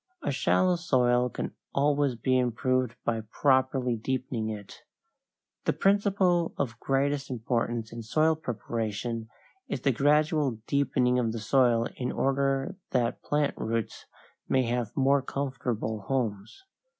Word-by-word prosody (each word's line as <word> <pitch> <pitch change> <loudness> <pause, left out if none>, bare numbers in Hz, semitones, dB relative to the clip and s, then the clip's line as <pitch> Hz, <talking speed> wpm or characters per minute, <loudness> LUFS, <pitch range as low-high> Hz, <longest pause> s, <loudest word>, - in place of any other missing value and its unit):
A - - 0
shallow 180 -1 +2
soil 125 -6 +2
can - - -5 0.2
always 140 -2 +2
be 130 +3 +1
improved 125 0 +1
by 115 -1 0
properly 130 +2 +1
deepening 120 -1 -2
it. 105 -2 -8 0.9
The - - +2
principle 195 -4 +2
of 120 -4 -2
greatest 140 +1 0
importance 115 -2 -2
in 115 - -6
soil 155 +8 +2
preparation 115 -3 -4 0.4
is - - -3
the 140 - +3
gradual 145 0 +2
deepening 130 -3 +2
of 115 -2 0
the 115 - -4
soil 120 0 +3
in 125 -1 -2
order 135 +5 0
that 120 -1 0
plant 145 -1 0
roots 115 -1 -3 0.4
may 130 -1 +3
have 120 -2 -1
more 135 +1 +4
comfortable 125 -5 -3
homes. 125 - -2
130 Hz, 125 wpm, -28 LUFS, 115-140 Hz, 0.9 s, more